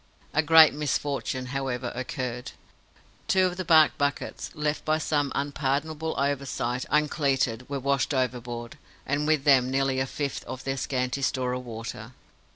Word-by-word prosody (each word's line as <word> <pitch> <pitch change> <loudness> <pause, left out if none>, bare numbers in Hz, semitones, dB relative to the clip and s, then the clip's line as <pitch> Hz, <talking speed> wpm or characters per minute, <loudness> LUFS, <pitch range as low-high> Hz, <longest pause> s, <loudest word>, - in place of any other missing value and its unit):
A 150 - +4
great 160 +1 +7
misfortune, 140 -3 -2
however, 130 -3 -2
occurred. 125 -1 -4 0.7
Two 185 -1 +4
of 180 -1 -2
the 185 - -2
bark 160 -3 +5
buckets, 145 0 -2
left 150 -1 -1
by 155 0 +2
some 145 -2 0
unpardonable 145 +3 -1
oversight 135 -3 -1
uncleated, 135 -5 +1
were 140 -1 -2
washed 140 +1 0
overboard, 125 0 -3 0.3
and 145 +2 0
with 155 -3 +2
them 130 -3 +5
nearly 135 0 +1
a 130 - 0
fifth 140 +1 -3
of 130 - -7
their 135 0 -2
scanty 130 0 -2
store 130 -1 0
of 125 0 -4
water. 115 0 -7
135 Hz, 150 wpm, -27 LUFS, 125-150 Hz, 0.7 s, great